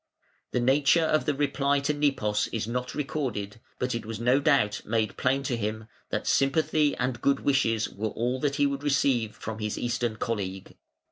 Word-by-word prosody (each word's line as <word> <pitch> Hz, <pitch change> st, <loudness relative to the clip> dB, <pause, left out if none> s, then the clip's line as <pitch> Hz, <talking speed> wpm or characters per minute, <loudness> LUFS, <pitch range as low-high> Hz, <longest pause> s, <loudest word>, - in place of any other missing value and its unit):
The -, -, 0 dB
nature 140 Hz, +6 st, +4 dB
of 155 Hz, -1 st, +2 dB
the 150 Hz, -2 st, +1 dB
reply 140 Hz, 0 st, +1 dB
to 145 Hz, +2 st, 0 dB
Nepos 120 Hz, -8 st, +1 dB
is 110 Hz, -2 st, -3 dB
not 125 Hz, +1 st, -3 dB
recorded, 125 Hz, -8 st, -3 dB, 0.2 s
but 125 Hz, 0 st, -1 dB
it 115 Hz, -, -3 dB
was 110 Hz, -1 st, -6 dB
no 125 Hz, +3 st, +3 dB
doubt 135 Hz, -7 st, +2 dB
made 110 Hz, -1 st, -1 dB
plain 135 Hz, +2 st, +1 dB
to 135 Hz, -3 st, -1 dB
him 110 Hz, 0 st, -3 dB, 0.2 s
that -, -, -2 dB
sympathy 150 Hz, +1 st, +2 dB
and 125 Hz, -1 st, -2 dB
good 140 Hz, 0 st, +2 dB
wishes 115 Hz, -6 st, +2 dB
were 105 Hz, +3 st, -4 dB
all 125 Hz, +4 st, -2 dB
that 140 Hz, 0 st, 0 dB
he 145 Hz, -, +3 dB
would 140 Hz, 0 st, -1 dB
receive 135 Hz, -6 st, +1 dB
from 110 Hz, 0 st, -6 dB
his 105 Hz, -1 st, -3 dB
Eastern 120 Hz, -1 st, -1 dB
colleague. 95 Hz, -4 st, -4 dB
125 Hz, 185 wpm, -27 LUFS, 110-140 Hz, 0.2 s, nature